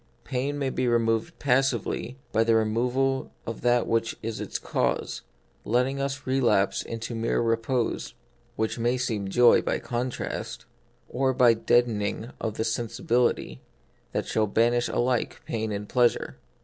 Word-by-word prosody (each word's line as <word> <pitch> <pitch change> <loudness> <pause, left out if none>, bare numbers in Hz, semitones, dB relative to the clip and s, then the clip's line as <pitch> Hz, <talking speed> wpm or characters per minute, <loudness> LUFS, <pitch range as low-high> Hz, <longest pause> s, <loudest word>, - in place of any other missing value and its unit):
Pain 140 +2 -2
may 135 -2 -1
be 130 -1 -1
removed 115 -1 +1
passively 130 -2 0
by 110 - +3
the 115 0 +3
removal 125 +5 +1 0.2
of 115 - -5
that 120 0 +3
which 115 0 0
is 110 0 -4
its - - -3
cause, - - -1 0.4
letting 125 +4 +1
us 140 0 -3
relapse 130 -7 +2
into 115 +1 -5
mere 115 0 0
repose, 115 +1 -1 0.4
which 110 +2 -2
may 120 +2 +1
seem 110 -6 -2
joy 120 +3 +6
by - - -1
contrast, 125 +1 -4 0.4
or 130 0 0
by 125 -3 +6
the 110 - -7
deadening 115 -1 +1
of 110 -2 -2
the - - 0
sensibility, 115 - 0 0.5
that - - -2
shall 110 -1 +1
banish 120 +3 +2
alike 125 -1 0
pain 110 -1 -2
and 105 0 -4
pleasure. 120 0 +1
120 Hz, 145 wpm, -26 LUFS, 115-125 Hz, 0.5 s, joy